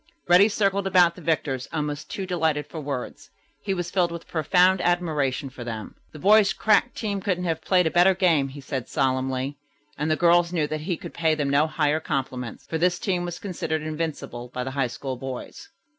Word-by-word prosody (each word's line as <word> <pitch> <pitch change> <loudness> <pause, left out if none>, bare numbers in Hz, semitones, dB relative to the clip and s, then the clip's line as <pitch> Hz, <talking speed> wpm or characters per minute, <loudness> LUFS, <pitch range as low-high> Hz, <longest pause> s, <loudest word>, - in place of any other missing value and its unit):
Reddy 180 +4 +6
circled 200 -2 +1
about 180 -3 +5
the 180 - -13
victors 145 -5 -1
almost 150 -1 -3
too 195 - -4
delighted 160 -5 0
for 155 +2 -7
words. 140 -4 -5 0.3
He 195 -2 -2
was 175 0 -4
filled 175 -3 +1
with 170 0 -8
profound 180 +3 +3
admiration 155 -6 0
for 125 - -8
them. 110 -2 -6 0.2
"The - - -11
boys' 205 +4 +5
crack 220 +3 +2
team 200 -3 -3
couldn't 180 -2 -1
have 165 -2 -1
played 180 0 +3
a 160 - +1
better 180 +2 +5
game," 165 -7 +3
he 140 +1 -9
said 130 -2 -4
solemnly, 130 +1 -1 0.4
and 150 - 0
the 155 - +3
girls 170 +1 +4
knew 165 -4 +1
that 155 +1 -4
he 170 +1 -2
could - - -9
pay 160 -2 +1
them 145 -2 -1
no 145 +3 +3
higher 155 -1 +1
compliment, 130 -5 -4
for 160 - -4
this 180 +1 +2
team 180 -2 -1
was 175 0 -5
considered 165 -5 -3
invincible 155 -6 -4
by 125 0 -3
the 130 - -4
High 135 -1 0
School 130 +2 -5
boys. 130 0 -7
160 Hz, 205 wpm, -25 LUFS, 140-180 Hz, 0.4 s, Reddy